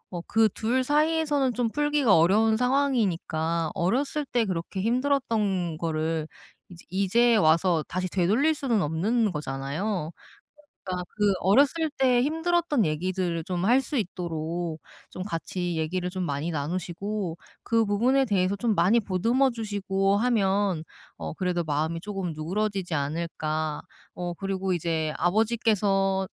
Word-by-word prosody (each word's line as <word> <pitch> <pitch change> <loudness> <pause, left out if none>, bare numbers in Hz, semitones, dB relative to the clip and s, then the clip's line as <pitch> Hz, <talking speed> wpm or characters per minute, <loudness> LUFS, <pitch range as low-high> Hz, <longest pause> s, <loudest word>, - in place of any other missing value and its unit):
어 175 - -3
그 225 0 +4
2 240 +6 0
사이에서는 295 -2 +1
좀 245 -2 0
풀기가 295 -5 +3
어려운 210 +7 +4
상황이니까 195 - 0
어렸을 270 - 0
때 240 -4 0
그렇게 185 +1 -4
힘들었던 225 - 0
거를 160 -1 -1 0.4
이제 170 -2 -14
이제 225 +5 +3
와서 165 -3 +3
다시 185 +1 -2
되돌릴 215 - +2
수는 245 -9 0
없는 205 +8 +1
거잖아요. 150 +5 -3 0.7
그러니까 180 -1 -4
그 205 -2 +3
어렸을 285 - +3
때 250 -2 +4
힘들었던 320 - +1
얘기들을 170 +1 -2
좀 180 0 -2
할 250 +4 +4
수 270 +1 -2
있도록 170 -3 -3 0.3
좀 185 - -6
같이 175 -2 -3
얘기를 175 +3 -2
좀 185 0 -3
많이 145 +1 -2
나누시고 175 +4 -3 0.3
그 230 -1 +2
부분에 245 +7 +2
대해서 200 -4 +1
좀 225 +1 0
많이 195 +7 +4
보듬어 230 +7 +1
주시고 200 -3 0
하면 200 -6 +1 0.4
어 - - -5
그래도 180 -1 -1
마음이 155 +2 -1
쪼금 195 -2 -4
누그러지지 185 +3 -2
않을까. 155 +1 -2 0.3
어 175 -1 -4
그리고 190 +1 -2
이제 160 -2 -1
아버지께서 195 -1 +1
195 Hz, 300 characters per minute, -26 LUFS, 170-235 Hz, 0.7 s, 그